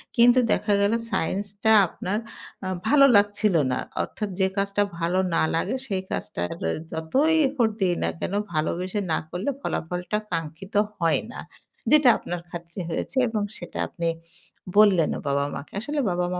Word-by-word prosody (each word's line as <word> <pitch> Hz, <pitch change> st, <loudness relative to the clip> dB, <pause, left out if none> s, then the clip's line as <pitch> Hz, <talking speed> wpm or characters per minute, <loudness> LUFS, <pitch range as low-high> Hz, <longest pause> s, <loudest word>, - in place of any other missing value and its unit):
কিন্তু 245 Hz, +1 st, +6 dB
দেখা 210 Hz, -1 st, +2 dB
গেল 200 Hz, +2 st, +3 dB, 0.2 s
সায়েন্সটা 205 Hz, +5 st, 0 dB, 0.2 s
আপনার 190 Hz, +5 st, -3 dB, 0.5 s
আ -, -, -2 dB, 0.2 s
ভালো 280 Hz, -1 st, +7 dB
লাগছিল 205 Hz, -1 st, +3 dB, 0.2 s
না। 125 Hz, -, 0 dB, 0.2 s
অর্থাৎ 210 Hz, -2 st, -5 dB
যে 190 Hz, -, +4 dB
কাজটা 200 Hz, +1 st, +1 dB, 0.2 s
ভালো 175 Hz, +2 st, +1 dB, 0.2 s
না -, -, +3 dB
লাগে, 190 Hz, +9 st, 0 dB
সেই 190 Hz, -3 st, -1 dB
কাজটা -, -, -4 dB, 0.5 s
যতই 265 Hz, -, +1 dB
এফোর্ট 250 Hz, -5 st, +1 dB
দেই 180 Hz, -2 st, +3 dB
না -, -, +1 dB
কেনো 200 Hz, -, -2 dB, 0.2 s
ভালোবেসে 180 Hz, +6 st, -1 dB
না -, -, +2 dB
করলে 185 Hz, -, -3 dB
ফলাফলটা 180 Hz, -, -2 dB
কাঙ্ক্ষিত 165 Hz, +4 st, -5 dB, 0.2 s
হয় 165 Hz, -6 st, +2 dB
না। -, -, -8 dB, 0.5 s
যেটা 295 Hz, -4 st, +7 dB
আপনার 175 Hz, 0 st, -5 dB
খাতিরে 170 Hz, +1 st, -7 dB
হয়েছে 170 Hz, +10 st, -4 dB
এবং 220 Hz, -2 st, -1 dB, 0.2 s
সেটা -, -, -9 dB
আপনি 170 Hz, -2 st, -3 dB, 0.7 s
বললেনও 190 Hz, -7 st, +5 dB
বাবা-মাকে। 140 Hz, +1 st, -2 dB
আসলে 290 Hz, +7 st, -3 dB
বাবা-মা 180 Hz, 0 st, -1 dB
190 Hz, 145 wpm, -25 LUFS, 170-215 Hz, 0.7 s, ভালো